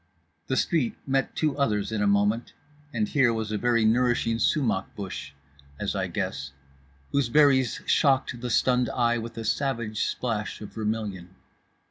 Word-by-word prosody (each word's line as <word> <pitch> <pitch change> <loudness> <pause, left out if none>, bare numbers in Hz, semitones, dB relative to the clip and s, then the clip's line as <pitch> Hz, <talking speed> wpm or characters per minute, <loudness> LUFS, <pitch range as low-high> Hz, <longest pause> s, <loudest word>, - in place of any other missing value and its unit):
The 130 - 0
street 150 -9 +1
met 135 0 0
two 155 -3 0
others 105 -6 0
in 110 -2 -1
a 105 - +2
moment, 105 +3 +1 0.4
and 215 - 0
here 135 -10 +3
was 110 -2 -3
a 105 - 0
very 120 -2 +2
flourishing 115 0 +2
sumach 115 -8 +1
bush 95 -7 -6 0.5
(as - - -1
I - - -1
guess) 70 0 -4 0.6
whose 140 -4 +1
berries 135 -2 +4
shocked 135 -4 +2
the 125 - -3
stunned 125 +1 +2
eye 120 -1 +1
with 115 0 -7
a 115 - -4
savage 115 -3 -1
splash 110 -4 -3
of 105 - -9
vermilion. 105 -5 -4
115 Hz, 155 wpm, -26 LUFS, 105-130 Hz, 0.6 s, berries